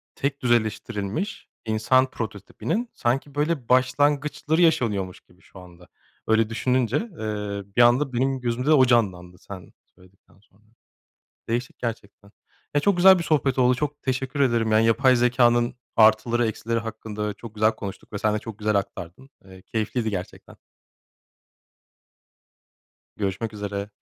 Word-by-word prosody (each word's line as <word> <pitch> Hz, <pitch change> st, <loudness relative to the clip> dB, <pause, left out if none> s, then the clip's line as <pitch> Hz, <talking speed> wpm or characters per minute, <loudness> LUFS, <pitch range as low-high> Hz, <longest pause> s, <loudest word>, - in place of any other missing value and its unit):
tek 140 Hz, 0 st, -3 dB
düzeleştirilmiş 110 Hz, -, -1 dB, 0.2 s
insan 120 Hz, +4 st, +2 dB
prototipinin 130 Hz, -, -4 dB
sanki 135 Hz, +4 st, -2 dB
böyle 145 Hz, -4 st, -1 dB
başlangıçları 145 Hz, +5 st, +2 dB
yaşanıyormuş 105 Hz, -, +1 dB
gibi 90 Hz, +1 st, -26 dB
şu 95 Hz, -, -15 dB
anda. 90 Hz, -1 st, -15 dB, 0.4 s
Öyle 110 Hz, 0 st, +2 dB
düşününce, 125 Hz, +2 st, 0 dB
eee, 105 Hz, -, -4 dB
bir 120 Hz, -, +5 dB
anda 125 Hz, +3 st, +4 dB
benim 130 Hz, +2 st, 0 dB
gözümde 120 Hz, +2 st, -2 dB
de 155 Hz, -, +6 dB
o 135 Hz, -4 st, +6 dB
canlandı, 95 Hz, -7 st, 0 dB
sen 95 Hz, -2 st, -11 dB, 0.2 s
söyledikten 95 Hz, +1 st, -24 dB
sonra. 105 Hz, +1 st, -30 dB, 0.9 s
Değişik 120 Hz, +2 st, -3 dB
gerçekten. 105 Hz, -3 st, -7 dB, 0.4 s
Ya, 145 Hz, -, +3 dB
çok 200 Hz, +3 st, +2 dB
güzel 190 Hz, +1 st, +7 dB
bir -, -, -2 dB
sohbet 140 Hz, -5 st, +1 dB
oldu, 125 Hz, 0 st, +4 dB
çok 150 Hz, +2 st, -4 dB
teşekkür 130 Hz, +1 st, -3 dB
ederim. 115 Hz, -5 st, +2 dB
Yani 110 Hz, +1 st, +4 dB
yapay 130 Hz, +3 st, +4 dB
zekânın 120 Hz, -1 st, +2 dB, 0.2 s
artıları, 115 Hz, +2 st, +4 dB
eksileri 115 Hz, +1 st, -2 dB
hakkında 110 Hz, -2 st, -5 dB
çok 115 Hz, +1 st, -12 dB
güzel 110 Hz, +1 st, +3 dB
konuştuk 100 Hz, 0 st, -9 dB
ve -, -, -2 dB
sen 105 Hz, +1 st, 0 dB
de -, -, -1 dB
çok 110 Hz, -1 st, -9 dB
güzel 105 Hz, 0 st, 0 dB
aktardın. 100 Hz, +5 st, -5 dB, 0.2 s
Eee, 95 Hz, -1 st, -14 dB
keyifliydi 110 Hz, +2 st, -2 dB
gerçekten. 95 Hz, -3 st, -7 dB, 2.6 s
Görüşmek 105 Hz, +2 st, -3 dB
üzere. 100 Hz, -1 st, -5 dB
115 Hz, 135 wpm, -24 LUFS, 105-130 Hz, 2.6 s, güzel